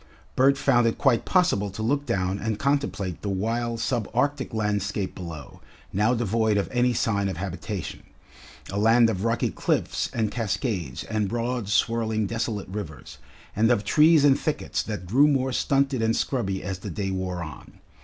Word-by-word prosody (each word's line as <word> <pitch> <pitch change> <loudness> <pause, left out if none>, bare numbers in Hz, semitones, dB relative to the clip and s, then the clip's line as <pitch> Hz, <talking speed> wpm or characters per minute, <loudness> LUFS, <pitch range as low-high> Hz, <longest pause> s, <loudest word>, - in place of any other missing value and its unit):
Bert 135 +2 +4
found 120 -4 +3
it 115 - 0
quite 130 -5 +2
possible 175 - +2
to 100 +3 -6
look 140 +5 0
down 95 +1 0
and 110 -1 -2
contemplate 140 - -1
the 100 - -3
wild 115 +4 -1
sub 115 -2 -1
arctic 140 +1 0
landscape 105 -2 -1
below, 80 -5 -9 0.3
now 110 +5 +2
devoid 110 -1 +1
of 100 - 0
any 125 0 +2
sign 100 -4 0
of 95 - -5
habitation, 95 0 -5 0.7
a 100 - -2
land 115 +2 +5
of 95 -2 -3
rocky 115 0 0
cliffs - - -1
and 110 -3 -1
cascades 100 - -2
and 105 -3 -1
broad 120 -1 -2
swirling 110 0 +1
desolate 110 -1 -3
rivers, 80 -9 -7 0.4
and 115 +2 +3
of 120 -4 +2
trees 150 +7 +5
and 135 -2 +5
thickets 155 - -2
that 105 -5 -5
grew 130 +11 +4
more 135 -2 +1
stunted 135 0 +1
and 115 0 +2
scrubby 100 -8 -1
as 95 -1 -4
the - - -6
day 100 -2 -3
wore 90 -2 -3
on. 75 -5 -10
110 Hz, 170 wpm, -25 LUFS, 100-125 Hz, 0.7 s, land